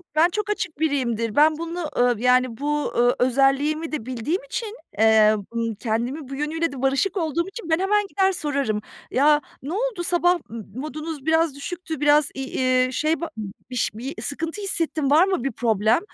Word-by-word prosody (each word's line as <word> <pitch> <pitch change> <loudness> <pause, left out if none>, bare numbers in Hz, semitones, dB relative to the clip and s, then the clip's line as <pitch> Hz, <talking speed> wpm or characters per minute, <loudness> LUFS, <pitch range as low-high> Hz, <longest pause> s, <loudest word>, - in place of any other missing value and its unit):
ben 330 +3 +5
çok 420 +2 -3
açık 365 -7 -3
biriyimdir. 235 -8 0
Ben 305 +1 +5
bunu, 335 -1 -4
ııı, 245 -1 +4
yani 250 -1 +3
bu, 295 +1 -1
ııı, 245 +1 +4
özelliğimi 275 +5 +2
de 270 -7 -4
bildiğim 260 - -2
için, 460 -3 -5 0.2
eee, 220 -1 +6 0.2
ımm, 230 -1 -1
kendimin 245 +6 -3
bu 275 - -5
yönüyle 320 +3 -1
de 265 -2 -7
barışık 275 +9 +1
olduğum 335 +1 -1
için 385 -3 -8
ben 320 +2 +3
hemen 410 +1 +2
gider 385 -1 +2
sorarım. 280 - -1 0.3
"Ya, 295 +3 +4 0.2
ne 300 +5 -4
oldu, 440 -4 -2
sabah 350 0 +2 0.4
modunuz 305 +1 -6
biraz 320 -2 +2
düşüktü, 320 +1 -6
biraz 295 0 +4
i 270 -1 -4 0.3
ııı, 255 - -5
şey, 310 +4 +1 0.5
bi 250 - -7
ş 240 - +1
bir 260 +5 -6
sıkıntı 325 +7 -4
hissettim, 320 -7 -1
var 320 +5 +6
mı 380 -10 -1
bir 275 - -1
problem?" 220 +1 +2
295 Hz, 175 wpm, -23 LUFS, 255-335 Hz, 0.5 s, eee